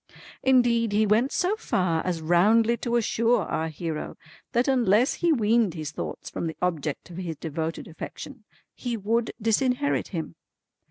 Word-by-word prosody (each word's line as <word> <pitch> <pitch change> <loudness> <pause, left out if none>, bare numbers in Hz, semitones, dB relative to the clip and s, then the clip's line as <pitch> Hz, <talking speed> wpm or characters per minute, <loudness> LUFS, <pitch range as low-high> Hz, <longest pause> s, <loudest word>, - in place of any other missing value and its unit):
Indeed 240 -4 +3
he 215 +1 +3
went 220 +6 +2
so 370 +4 +1
far 180 - 0
as 170 -3 -2
roundly 215 +8 +4
to 240 -1 -2
assure 230 -1 +2
our 160 -1 -2
hero 160 0 -5 0.3
that 240 +1 +1
unless 245 -2 +3
he 345 - +1
weaned 225 - +2
his 155 -2 -5
thoughts - - -6
from 170 - -3
the 160 - -6
object 165 -3 -2
of 170 - -9
his 175 -3 -4
devoted 160 +1 -4
affection, 165 - -9 0.3
he 240 -2 -4
would 225 +3 0
disinherit 250 +5 +1
him. 160 - -5
210 Hz, 155 wpm, -26 LUFS, 165-240 Hz, 0.3 s, roundly